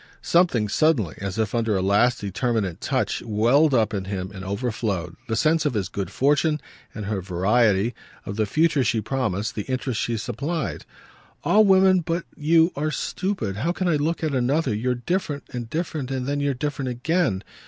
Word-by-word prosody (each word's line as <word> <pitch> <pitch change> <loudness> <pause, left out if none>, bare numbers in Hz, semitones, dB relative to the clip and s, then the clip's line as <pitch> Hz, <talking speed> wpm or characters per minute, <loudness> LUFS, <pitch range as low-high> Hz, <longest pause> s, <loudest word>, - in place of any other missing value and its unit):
Something 170 -11 +3
suddenly, 115 - +2
as 100 +1 -4
if 110 -1 -1
under 115 -4 +1
a - - 0
last 105 +6 +3
determinant 100 -2 -1
touch, - - -1
welled 120 +7 +3
up 110 -3 +2
in 95 -2 -2
him 95 -1 -4
and 95 -1 -8
overflowed 100 -4 -2
the 110 - -1
sense 155 +7 +2
of 145 -5 0
his 95 -4 -1
good 100 -3 -4
fortune 150 +3 +2 0.4
and 105 -2 -5
her 100 -1 -2
variety, 100 +4 +2 0.3
of 100 - -5
the 110 0 0
future 155 +1 +2
she 115 -1 +1
promised, 110 -3 -2
the 105 - -3
interest 130 -3 -1
she 115 -1 -1
supplied. 120 - -3 0.6
"All 215 +1 +5
women 190 -1 +5
but 170 +1 -2
you 165 +3 +3
are 150 +2 -1
stupid. 150 - -2
How 155 +11 0
can 185 +1 -2
I 160 -3 +3
look 160 +3 -1
at 155 -2 0
another? 130 +2 +1
You're 125 +4 0
different 145 +2 -2
and 120 -2 -5
different 155 -4 -3
and 130 -2 -2
then 145 +1 -1
you're 140 -1 0
different 140 -1 -3
again. 125 - 0
125 Hz, 185 wpm, -24 LUFS, 105-155 Hz, 0.6 s, All